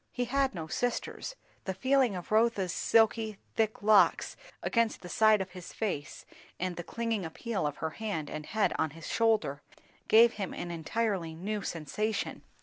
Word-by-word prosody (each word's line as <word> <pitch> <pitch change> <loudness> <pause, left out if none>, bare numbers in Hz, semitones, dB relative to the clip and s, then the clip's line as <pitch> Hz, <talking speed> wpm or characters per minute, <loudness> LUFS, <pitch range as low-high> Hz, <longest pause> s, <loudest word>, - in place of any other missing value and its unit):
He 245 - -1
had 270 -1 +1
no 165 -2 -4
sisters; 245 - -3 0.3
the 190 - -2
feeling 260 0 +3
of 180 +2 -7
Rotha's 215 -5 +2
silky, 220 -1 +2 0.2
thick 220 -2 0
locks 210 -1 +4 0.3
against 230 -1 +1
the 180 - -9
side 215 +2 +5
of 190 -1 -5
his 180 -2 -10
face 170 -9 -4 0.3
and 185 0 -2
the 175 - -4
clinging 230 0 -2
appeal 190 +2 -2
of 145 - -5
her 160 - -3
hand 200 -7 -3
and 150 +1 -6
head 215 -2 +1
on 160 - +2
his 165 - -9
shoulder, 220 -11 +1 0.5
gave 230 +2 +7
him 195 -3 -4
an 175 - -5
entirely 170 0 -2
new 205 +5 -3
sensation. 195 +6 -3
210 Hz, 165 wpm, -30 LUFS, 175-225 Hz, 0.5 s, gave